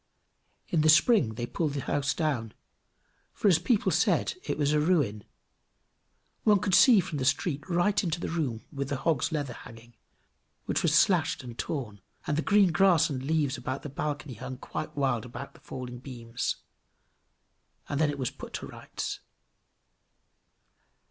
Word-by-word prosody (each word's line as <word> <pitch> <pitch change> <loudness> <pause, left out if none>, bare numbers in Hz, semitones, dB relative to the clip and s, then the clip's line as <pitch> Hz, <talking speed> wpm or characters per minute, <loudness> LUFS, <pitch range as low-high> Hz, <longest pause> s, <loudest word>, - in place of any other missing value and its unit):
In 165 - +2
the 155 - +4
spring 155 - +5
they 120 - -3
pulled 150 +3 -2
the 140 - -2
house 145 0 0
down, 135 -9 -1 0.8
for, - - 0
as 175 -5 +5
people 205 +5 +1
said, - - +2
it - - -3
was 145 0 +1
a 150 - +3
ruin. 145 - +1 1.2
One 210 -2 +5
could 190 0 -1
see 235 0 +7
from 165 -5 -5
the - - -1
street 145 +5 0
right 180 +4 +2
into 170 -2 -1
the - - -3
room 140 -9 -2
with 140 -1 -3
the 140 - -1
hog's 140 +1 0
leather 145 -5 -2
hanging, 115 0 -13 0.7
which - - 0
was 160 -2 +2
slashed 165 -8 +2
and 120 -2 -8
torn; 115 - -4 0.2
and 150 - 0
the 155 - +1
green 200 0 +4
grass 175 -2 +4
and 130 -2 -3
leaves 145 -1 0
about 130 +1 -4
the 145 - -5
balcony 145 0 -4
hung 130 +4 -7
quite 135 - -6
wild 130 -5 +1
about 125 +3 -8
the - - -18
falling 125 -2 -7
beams. 120 -2 -4 1.3
And 145 +1 -1
then 155 - +3
it 145 - -3
was 130 -3 -2
put - - -10
to - - -4
rights. - - -6
145 Hz, 170 wpm, -28 LUFS, 130-165 Hz, 1.3 s, see